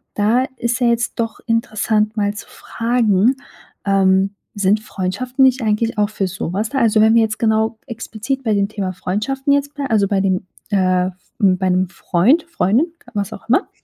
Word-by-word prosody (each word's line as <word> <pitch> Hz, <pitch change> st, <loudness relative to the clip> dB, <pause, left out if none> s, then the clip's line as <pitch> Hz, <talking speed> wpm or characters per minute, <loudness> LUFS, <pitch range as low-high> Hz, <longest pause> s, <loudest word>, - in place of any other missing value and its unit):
da 220 Hz, +5 st, +2 dB
ist 235 Hz, +1 st, -1 dB
ja 245 Hz, -, +4 dB
jetzt 235 Hz, 0 st, +1 dB
doch 225 Hz, -1 st, -2 dB
interessant, 220 Hz, -1 st, 0 dB
mal 205 Hz, -1 st, +1 dB
zu 210 Hz, -, -9 dB
fragen 230 Hz, 0 st, +1 dB, 0.5 s
ähm, 195 Hz, 0 st, +3 dB, 0.2 s
sind 205 Hz, +1 st, +1 dB
Freundschaften 220 Hz, +7 st, -2 dB
nicht 260 Hz, 0 st, +3 dB
eigentlich 220 Hz, +1 st, 0 dB
auch 205 Hz, 0 st, +2 dB
für 200 Hz, -3 st, -2 dB
sowas 195 Hz, +3 st, -3 dB
da? 270 Hz, -, -1 dB
Also 225 Hz, -3 st, +3 dB
wenn 220 Hz, +1 st, +5 dB
wir 230 Hz, -, +6 dB
jetzt 215 Hz, -1 st, -1 dB
genau 220 Hz, 0 st, +1 dB
explizit 235 Hz, +2 st, -5 dB
bei 220 Hz, -3 st, +1 dB
dem 200 Hz, -1 st, +1 dB
Thema 200 Hz, -3 st, -3 dB
Freundschaften 230 Hz, -, -1 dB
jetzt 285 Hz, +1 st, 0 dB
blei 285 Hz, -1 st, -3 dB
also, 210 Hz, -3 st, +2 dB
bei 200 Hz, -, +1 dB
dem 190 Hz, -1 st, 0 dB, 0.3 s
äh, 185 Hz, -2 st, +2 dB, 0.3 s
bei 190 Hz, -3 st, +2 dB
'nem 185 Hz, +1 st, +2 dB
Freund, 190 Hz, -, +2 dB
Freundin, 310 Hz, -, +1 dB, 0.2 s
was 200 Hz, -2 st, -2 dB
auch -, -, -10 dB
immer, 300 Hz, -, +2 dB
215 Hz, 180 wpm, -19 LUFS, 195-235 Hz, 0.5 s, wir